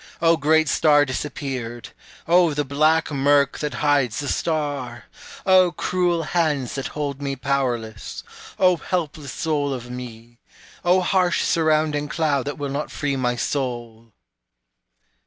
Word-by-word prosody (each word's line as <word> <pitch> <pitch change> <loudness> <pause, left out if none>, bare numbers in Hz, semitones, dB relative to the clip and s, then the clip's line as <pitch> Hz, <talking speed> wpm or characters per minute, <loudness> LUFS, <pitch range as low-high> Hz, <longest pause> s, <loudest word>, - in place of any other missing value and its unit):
O 165 0 +4
great 160 0 +3
star 145 -2 +4
disappeared 130 -3 -5 0.4
O 170 -2 +4
the 145 0 -1
black 155 +4 +2
murk 140 0 +2
that 150 -1 -3
hides 135 -7 +2
the 145 - -4
star! 145 -8 -2 0.4
O 185 -2 +5
cruel 175 -1 0
hands 150 -6 0
that 135 - -3
hold 145 -2 -3
me 140 -1 -2
powerless 125 -5 -3 0.3
O 185 -2 +4
helpless 155 -4 -3
soul 150 -3 -1
of 125 -1 -8
me! 120 -1 -9 0.4
O 180 +1 +4
harsh 180 -1 +2
surrounding 155 -2 +1
cloud 145 -3 0
that 145 - -4
will 145 -1 -4
not 145 +2 -3
free 145 -2 -2
my 125 -2 0
soul! 120 -4 -4
145 Hz, 135 wpm, -22 LUFS, 130-160 Hz, 0.4 s, O